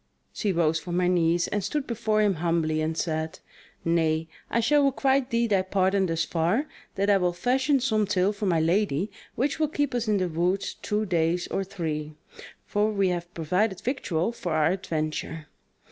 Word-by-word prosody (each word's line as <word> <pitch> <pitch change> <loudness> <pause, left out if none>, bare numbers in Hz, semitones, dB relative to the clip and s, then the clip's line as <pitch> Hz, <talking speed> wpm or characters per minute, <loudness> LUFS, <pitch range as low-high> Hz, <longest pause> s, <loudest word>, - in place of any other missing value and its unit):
She 210 - -1
rose 165 -2 +2
from 175 +3 -2
her 180 - +2
knees, 175 -1 +2
and 205 -1 -1
stood 295 +7 -2
before 220 -2 +1
him 205 -2 +3
humbly 165 -2 +1
and 160 +1 -2
said: 160 -1 -2 0.5
"Nay, 165 -1 +1 0.2
I 235 - +1
shall 290 +5 +3
requite 270 -1 +2
thee 235 -1 +2
thy 200 -4 +2
pardon 190 0 +1
thus 165 -1 0
far, 175 - +1 0.3
that 200 +1 0
I 200 - +5
will 180 -2 +1
fashion 260 +9 +2
some 220 -5 +1
tale 195 0 +2
for 205 0 -3
my 170 -3 +3
lady 175 +1 +1 0.2
which 280 +5 0
will 310 - +3
keep 290 -2 -1
us 240 -2 -1
in 210 -1 +3
the 185 -2 0
woods 175 +4 0
two 210 +1 -2
days 175 -1 +1
or 195 - -1
three; 155 -6 -4 0.5
for 210 +1 +1
we 195 -3 +1
have 175 -1 -3
provided 180 +5 0
victual 225 - -1
for 180 -8 -4
our 155 +1 +3
adventure." 160 -3 -3
185 Hz, 185 wpm, -26 LUFS, 165-215 Hz, 0.5 s, I